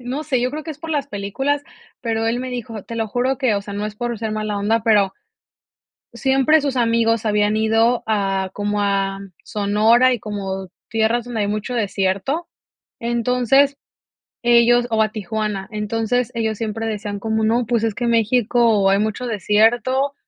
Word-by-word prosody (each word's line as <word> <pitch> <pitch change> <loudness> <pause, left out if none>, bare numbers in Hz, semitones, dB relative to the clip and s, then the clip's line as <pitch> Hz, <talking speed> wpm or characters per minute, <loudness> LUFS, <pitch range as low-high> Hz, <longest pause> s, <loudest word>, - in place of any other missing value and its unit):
no 255 +5 -4
sé, 260 -5 0
yo 250 +1 0
creo 305 +2 -5
que 320 - -5
es 300 - -8
por 325 - -8
las 290 -3 -1
películas, 270 +7 -2 0.4
pero 225 -1 -1
él 235 +2 0
me 255 - -4
dijo 230 -4 -6
te 230 - -7
lo 225 - -1
juro 250 +4 0
que, 255 -6 +1
o 200 - 0
sea, 200 0 -7
no 205 +1 -3
es 215 - -5
por 240 +1 -3
ser 220 0 -3
mala 215 -1 -2
onda, 210 +2 +1
pero, 205 -4 +3 1.0
siempre 270 +5 +3
sus 275 -2 -2
amigos 230 -1 +2
habían 210 0 +2
ido 225 +2 +2
a, 195 -3 0
como 205 0 -1
a 195 -1 0 0.3
Sonora 220 +5 +3
y - - -3
como 195 -3 -5 0.2
tierras 225 +2 +1
donde 240 -3 -4
hay 205 - 0
mucho 215 +4 -3
desierto. 205 - -1 0.5
Entonces, 250 +4 +2 0.7
ellos 240 0 +5
o 220 -1 +2
a 215 - +2
Tijuana, 210 -1 -3
entonces, 225 +3 -1
ellos 220 -2 -1
siempre 225 0 -3
decían 205 -1 -4
como 220 +1 -1
no, 230 +2 +2
pues, 230 -1 0
es 220 -2 0
que 240 - -2
México 230 -2 +3
hay 195 +1 +3
mucho 215 +3 -2
desierto 230 +6 +2
225 Hz, 180 wpm, -20 LUFS, 210-245 Hz, 1.0 s, ellos